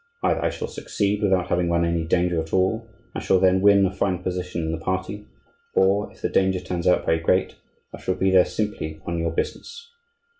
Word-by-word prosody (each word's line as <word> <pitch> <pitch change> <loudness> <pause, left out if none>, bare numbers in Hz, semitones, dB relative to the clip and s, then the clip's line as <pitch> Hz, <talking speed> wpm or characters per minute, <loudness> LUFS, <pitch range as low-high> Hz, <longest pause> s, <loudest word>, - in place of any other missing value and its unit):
Either - - +1
I - - +2
shall - - -5
succeed 100 0 -2
without 95 -3 +1
having 85 -1 +1
run 85 0 +2
any 85 -1 0
danger 85 0 +1
at 80 - -9
all, 110 +5 +1 0.2
and - - -5
shall 95 - +3
then 95 0 +3
win 100 -1 +5
a 95 - 0
fine 95 -2 -1
position 90 -2 -3
in 80 - -2
the 80 - -3
party; 95 +4 -4 0.5
or, 100 +2 +2
if - - -21
the - - +2
danger 95 -1 +2
turns 90 -1 -3
out 90 - +3
very 80 - +2
great, 90 +3 +1 0.4
I - - -8
shall 95 - -1
be 95 0 +1
there 95 -1 +6
simply 90 -8 -4
on 85 0 -2
your 85 0 0
business." 465 - -5
95 Hz, 215 wpm, -23 LUFS, 85-95 Hz, 0.5 s, there